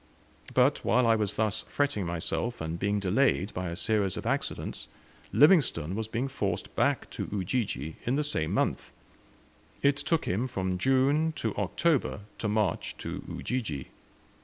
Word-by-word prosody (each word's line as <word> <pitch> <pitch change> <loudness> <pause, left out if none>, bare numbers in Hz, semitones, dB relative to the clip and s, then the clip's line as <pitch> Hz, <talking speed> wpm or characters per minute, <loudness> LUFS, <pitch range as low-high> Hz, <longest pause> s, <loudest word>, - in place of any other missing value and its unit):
But - - +4
while 125 +4 +3
I 115 - +5
was 105 -2 -1
thus 110 -1 0
fretting 140 -11 0
myself, 85 +8 -2
and 80 +1 -4
being 100 +1 +1
delayed 100 0 +2
by 90 -1 -3
a 85 - -4
series 100 -1 0
of - - -5
accidents, - - -2 0.4
Livingstone 130 - +4
was 110 +2 -2
being 115 +4 -1
forced 100 -9 -3
back - - +1
to - - -4
Ujiji 95 - -2
in 125 - +2
the 150 - +1
same 80 - 0
month. - - 0 0.9
It 140 0 +4
took 165 +2 0
him 110 +8 0
from 95 -5 -2
June 140 - +3
to - - -2
October 155 -10 +1 0.2
to 110 - -1
march 105 -4 0
to - - -5
Ujiji. 105 - -3
110 Hz, 155 wpm, -29 LUFS, 95-130 Hz, 0.9 s, I